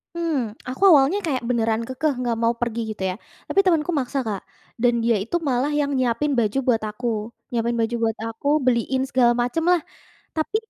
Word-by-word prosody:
Mmm, 330 -5 0 0.3
aku 260 - -7
awalnya 290 +6 +5
kayak 260 -6 -1
beneran 225 -2 +1
kekeh 280 +3 0
nggak 240 -2 0
mau 230 +1 +3
pergi 235 -1 -1
gitu 200 -3 -6
ya, 185 - -3 0.3
tapi 395 - +1
temanku 340 -2 +2
maksa 270 +2 -2
Kak 200 -3 -3 0.4
dan 245 -1 +4
dia 230 -1 +3
itu 235 - -4
malah 260 +4 +1
yang 285 -1 0
nyiapin 255 +4 +1
baju 220 +3 0
buat 225 -3 +3
aku, 240 +3 -5 0.4
nyiapin 235 0 0
baju 230 +1 0
buat 225 -1 0
aku 225 +5 -6 0.2
beliin 255 +1 +1
segala 245 -3 +4
macem 250 +7 -1
lah 355 - +4 0.6
tapi 315 +7 -2
250 Hz, 185 wpm, -23 LUFS, 230-290 Hz, 0.6 s, awalnya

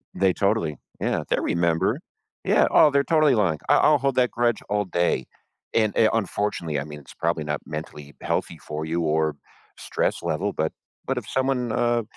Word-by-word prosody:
They 95 -1 +3
totally 80 -6 0 0.2
Yeah, - - 0
they - - +2
remember. 85 -1 +1 0.5
Yeah, - - +4
oh, 150 - +7
they're 140 0 +3
totally 155 -4 +3
lying 90 -8 +1
I - - +6
I'll 150 -1 +5
hold 135 -1 0
that 125 -1 +2
grudge 120 -1 +1
all 105 0 +1
day, 85 -1 0 0.5
and, 110 -2 +2
a 110 - +5
unfortunately, 100 -7 -1
I 70 - -3
mean, 75 -1 -9
it's 70 - -15
probably 85 -1 -1
not 75 -1 -2
mentally 75 -1 -8
healthy - - -2
for 75 +1 -5
you 85 +2 -1
or 80 -1 +1 0.4
stress - - -2
level, 100 +6 -1
but 80 0 -1 0.4
but - - -1
if - - -14
someone, 130 -3 0
uh, 120 0 +1
95 Hz, 185 wpm, -24 LUFS, 80-120 Hz, 0.5 s, oh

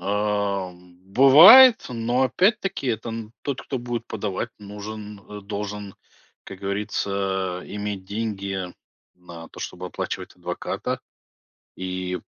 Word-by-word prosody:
А, 100 -2 -1
м, 90 0 -19 0.2
бывает, 185 - +9
но, 120 +1 0
опять-таки, 185 - +1
там 115 0 -7
тот, 135 -2 -3
кто 135 - -4
будет 120 -1 -4
подавать, 105 +1 -4
нужен 105 0 -8
э, 105 0 -10
должен, 105 0 -6 0.5
как 95 - -10
говорится, 100 -2 -2
а, - - -11
иметь 105 -2 -5
деньги 100 -3 -4 0.4
на 85 -2 -12
то, - - -12
чтобы 90 +1 -6
оплачивать - - -5
адвоката, - - -4 0.8
и 90 0 -4
105 Hz, 115 wpm, -24 LUFS, 95-115 Hz, 0.8 s, бывает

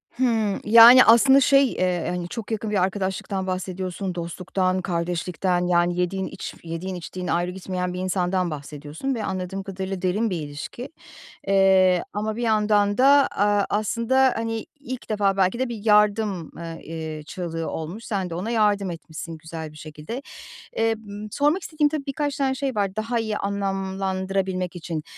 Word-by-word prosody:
Hımm, 225 -5 +1
yani, 235 +4 +9
aslında, 265 +4 +7
şey, 275 -1 +5
eee, 180 -2 0
hani, 175 -1 -3
çok 230 +1 -6
yakın 220 0 -2
bir 195 -3 +2
arkadaşlıktan 190 0 -2
bahsediyorsun, 185 0 -3
dostluktan, 185 +2 -1
kardeşlikten, 175 +1 -1
yani, 175 0 +2
yediğin 190 +1 -1
iç - - -7
yediğin 170 +3 -5
içtiğin 180 +1 -6
ayrı 175 +1 0
gitmeyen 180 -1 -4
bir 180 - -5
insandan 185 -1 0
bahsediyorsun 150 - -5
ve 220 - -3
anladığım 190 +1 -4
kadarıyla 190 -1 -5
derin 200 +5 +1
bir 180 - -2
ilişki. 150 - -7 0.6
Eee, 190 -2 +4
ama 215 +1 -2
bir 240 - -3
yandan 210 -2 +2
da, 280 +2 +6
aaa, 205 0 +2
aslında, 235 +5 +2
hani, 225 0 -3
ilk 260 -3 -7
defa 200 -2 +1
belki 190 +3 +2
de 260 -1 0
bir 225 -3 -7
yardım, 210 -4 +2
ııı, 165 0 -7
eee, 160 -1 -6
çığlığı 165 -2 -4
olmuş. 170 +8 -6
Sen 195 -5 -2
de 165 - -4
ona 190 +6 -3
yardım 205 -4 +2
etmişsin 165 0 -8
güzel 160 -1 -7
bir - - -16
şekilde. 155 - -7 0.5
Eee, 225 0 +2
ııı, 205 +1 -7
sormak 295 - +1
istediğim, 305 -2 +1
tabii, 290 -2 -4
birkaç 285 0 -2
tane 270 -1 +1
şey 265 -2 -2
var 200 -1 -1
daha 230 +2 -1
iyi 220 -2 -2
anlamlandırabilmek 190 -2 -2
için. 165 -2 -4
195 Hz, 160 wpm, -24 LUFS, 180-220 Hz, 0.6 s, yani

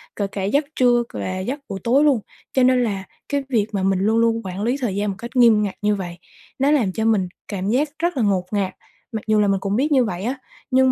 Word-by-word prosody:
kể 200 - -1
cả 195 0 -5
giấc 280 +10 +1
trưa 245 -1 +4
c - - -20
và 185 0 -3
giấc 255 +10 -3
buổi 195 - -4
tối 265 +5 +4
luôn, 280 -6 +4 0.3
cho 260 - +3
nên 255 -1 +4
là 200 -4 -2 0.3
cái 285 -1 0
việc 220 -5 +2
mà 195 -2 -1
mình 190 -1 +2
luôn 220 +3 +2
luôn 230 0 +2
quản 190 +2 -4
lý 245 +3 +1
thời 205 -6 -1
gian 205 +1 0
một 195 - -3
cách 235 +1 -7
nghiêm 230 -4 +6
ngặt 200 - -3
như 210 0 +2
vậy, 175 -3 -6 0.4
nó 280 +2 +3
làm 240 -11 +2
cho 220 +3 -2
mình 210 -5 +2 0.2
cảm 195 -1 -3
giác 275 +7 +2
rất 345 -3 0
là 240 - +2
ngột 190 -3 +1
ngạt. 200 -3 -1 0.4
Mặc 220 -2 -3
dù 215 -1 +3
là 205 - +3
mình 195 -1 +2
cũng 195 +1 -1
biết 280 +6 +1
như 260 -4 +4
vậy 180 -3 -4
á, 250 +5 -1 0.4
nhưng 260 0 +5
220 Hz, 270 wpm, -21 LUFS, 195-255 Hz, 0.4 s, nghiêm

